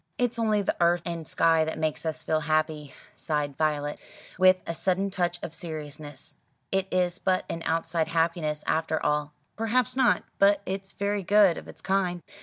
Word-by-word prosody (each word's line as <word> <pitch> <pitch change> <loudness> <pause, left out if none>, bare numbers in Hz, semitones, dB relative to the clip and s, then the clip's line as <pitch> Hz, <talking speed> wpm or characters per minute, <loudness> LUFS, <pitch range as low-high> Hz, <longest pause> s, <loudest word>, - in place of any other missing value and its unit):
"It's 245 -3 0
only 215 -2 +2
the - - 0
earth 170 0 +3
and 170 -2 -4
sky 165 -1 +3
that 160 - -3
make 155 -1 -1
us 160 0 -3
feel 155 0 +1
happy," 155 -1 -1 0.2
sighed 150 -3 -2
Violet, 150 -1 -1 0.4
with 185 0 +6
a 170 - -3
sudden 190 +3 0
touch 175 -2 -1
of 160 - -5
seriousness. 150 -3 -8 0.3
"It 195 0 +1
is 180 0 0
but 185 -1 +1
an 165 - -4
outside 165 0 0
happiness 165 -2 0
after 160 0 0
all." 150 0 0 0.2
"Perhaps 235 +3 +1
not; 260 -2 +3 0.2
but 200 0 +4
it's 195 +1 -5
very 200 0 -1
good 200 -1 +5
of - - -9
its - - -12
kind." 185 -3 0
170 Hz, 175 wpm, -27 LUFS, 155-195 Hz, 0.4 s, with